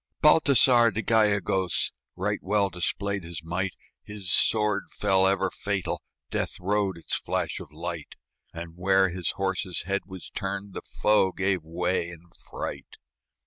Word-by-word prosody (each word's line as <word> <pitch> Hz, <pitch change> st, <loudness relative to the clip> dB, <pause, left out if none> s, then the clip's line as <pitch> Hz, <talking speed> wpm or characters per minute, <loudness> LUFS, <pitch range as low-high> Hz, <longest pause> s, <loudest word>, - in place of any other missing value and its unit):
Baltasar 135 Hz, -6 st, +6 dB
de 110 Hz, +3 st, -3 dB
Gallegos 100 Hz, -5 st, +2 dB, 0.2 s
Right -, -, -1 dB
well 100 Hz, 0 st, +1 dB
displayed 100 Hz, +3 st, -2 dB
his 85 Hz, -1 st, -7 dB
might; 90 Hz, +3 st, -2 dB, 0.3 s
His 100 Hz, -4 st, -6 dB
sword 105 Hz, -1 st, +2 dB
fell 95 Hz, -2 st, +3 dB
ever 95 Hz, -1 st, +2 dB
fatal, 100 Hz, -2 st, -2 dB, 0.3 s
Death -, -, -2 dB
rode 100 Hz, 0 st, 0 dB
its 85 Hz, -, -2 dB
flash -, -, -2 dB
of -, -, -10 dB
light; 85 Hz, 0 st, -6 dB, 0.4 s
And 85 Hz, 0 st, -8 dB
where 95 Hz, +1 st, +3 dB
his 90 Hz, -1 st, -2 dB
horse's 95 Hz, -2 st, -2 dB
head 100 Hz, +3 st, -2 dB
was 95 Hz, -3 st, -9 dB
turned 100 Hz, 0 st, -4 dB
The -, -, -5 dB
foe 105 Hz, -3 st, +2 dB
gave 95 Hz, -1 st, 0 dB
way 85 Hz, +2 st, -1 dB
in 85 Hz, -2 st, -10 dB, 0.3 s
fright. -, -, -6 dB
95 Hz, 145 wpm, -27 LUFS, 90-100 Hz, 0.4 s, Baltasar